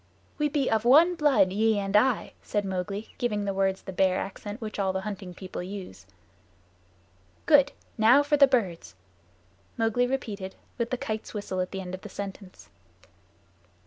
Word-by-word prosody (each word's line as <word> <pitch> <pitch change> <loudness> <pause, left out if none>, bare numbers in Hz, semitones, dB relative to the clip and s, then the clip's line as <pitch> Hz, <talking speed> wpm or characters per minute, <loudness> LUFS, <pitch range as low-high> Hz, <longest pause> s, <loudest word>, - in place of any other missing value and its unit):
"We 295 0 +2
be 275 -2 0
of 220 -1 +1
one 310 +9 +6
blood, 285 - +3
ye 220 +1 +2
and 200 0 -2
I," 240 +2 +2
said 205 -1 -2
Mowgli, 195 +3 -4
giving 210 -5 -1
the 200 - -1
words 195 0 0
the 190 - -7
Bear 185 0 +2
accent 205 +3 -6
which 215 -2 -6
all 190 -1 +1
the 190 0 -2
Hunting 195 -3 -6
People 185 -1 -7
use. 180 - -8 1.4
"Good. 290 -3 +5 0.3
Now 245 +6 +6
for 295 +1 +2
the 280 -1 +7
birds." 190 - -1 0.8
Mowgli 225 +2 +2
repeated, 210 -7 -4 0.2
with 235 0 -1
the 255 - -1
Kite's 215 -1 -5
whistle 205 -2 -3
at 185 - -3
the 195 - -5
end 180 -1 -7
of 185 - -6
the 210 - -9
sentence. 195 -1 -9
205 Hz, 170 wpm, -27 LUFS, 190-245 Hz, 1.4 s, the